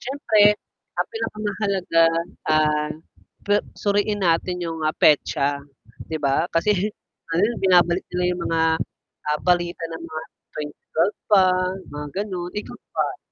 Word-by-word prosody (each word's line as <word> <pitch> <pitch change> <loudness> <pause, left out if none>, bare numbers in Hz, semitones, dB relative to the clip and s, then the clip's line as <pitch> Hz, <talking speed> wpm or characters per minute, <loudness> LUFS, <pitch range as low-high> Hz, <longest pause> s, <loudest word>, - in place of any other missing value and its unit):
siyempre 215 -6 +3 0.4
ang - - 0
pinakamahalaga 205 - 0 0.4
ah 150 -1 +2 0.5
pe 205 0 +4 0.2
suriin 205 0 0
natin 180 +1 +1
'yung, 165 -1 -4
ah, 155 - +2
petsa 140 -1 +3 0.5
'di 160 - -2
ba? 140 +2 +2
Kasi 205 +4 +1 0.7
binabalik 175 -1 +4
nila 180 0 0
'yung 180 0 -3
mga 165 0 +1 0.8
balita 175 0 +1 0.2
ng 165 - -11
mga 160 -1 -6 0.3
2012 150 +5 -2
pa 200 -3 +7 0.5
mga 150 0 -6 0.2
gano'n, 180 -3 -5
ikaw 210 - -5 0.2
ba? - - -1
175 Hz, 115 wpm, -23 LUFS, 160-205 Hz, 0.8 s, pa